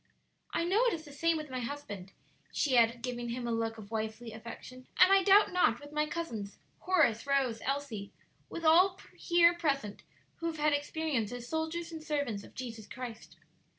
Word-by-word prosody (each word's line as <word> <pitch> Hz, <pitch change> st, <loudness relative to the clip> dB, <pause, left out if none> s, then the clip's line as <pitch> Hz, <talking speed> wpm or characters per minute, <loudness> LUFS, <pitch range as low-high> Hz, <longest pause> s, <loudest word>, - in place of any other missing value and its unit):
"I 335 Hz, -, 0 dB
know 390 Hz, +7 st, +3 dB
it 475 Hz, -, +2 dB
is 315 Hz, -1 st, -10 dB
the 290 Hz, -, -11 dB
same 330 Hz, +3 st, +1 dB
with 305 Hz, -3 st, -7 dB
my 255 Hz, -, -2 dB
husband," 230 Hz, -8 st, -6 dB, 0.4 s
she 270 Hz, -4 st, +1 dB
added, 235 Hz, 0 st, +4 dB
giving 240 Hz, -1 st, -3 dB
him 240 Hz, 0 st, -3 dB
a -, -, -1 dB
look 225 Hz, 0 st, -1 dB
of 210 Hz, -1 st, -11 dB
wifely 220 Hz, +1 st, -4 dB
affection; 235 Hz, +3 st, -10 dB
"and 365 Hz, +2 st, +8 dB
I 390 Hz, -, +6 dB
doubt 395 Hz, +1 st, +5 dB
not 295 Hz, -10 st, +3 dB
with 290 Hz, 0 st, -12 dB
my 300 Hz, 0 st, 0 dB
cousins 240 Hz, -11 st, -5 dB, 0.2 s
Horace, 290 Hz, -10 st, +2 dB
Rose, 270 Hz, -5 st, +1 dB
Elsie 265 Hz, -7 st, -3 dB, 0.4 s
with 335 Hz, -, -6 dB
all 365 Hz, +4 st, +6 dB, 0.2 s
here 345 Hz, 0 st, +4 dB
present 275 Hz, -11 st, -1 dB, 0.4 s
who 335 Hz, -, -3 dB
have 325 Hz, -1 st, -3 dB
had 300 Hz, 0 st, +2 dB
experience 290 Hz, -6 st, -1 dB
as 245 Hz, -1 st, -6 dB
soldiers 320 Hz, +2 st, -3 dB
and 320 Hz, -1 st, -7 dB
servants 285 Hz, -10 st, -2 dB
of -, -, -15 dB
Jesus 230 Hz, -4 st, -7 dB
Christ." 240 Hz, -3 st, -8 dB
275 Hz, 185 wpm, -31 LUFS, 230-325 Hz, 0.4 s, and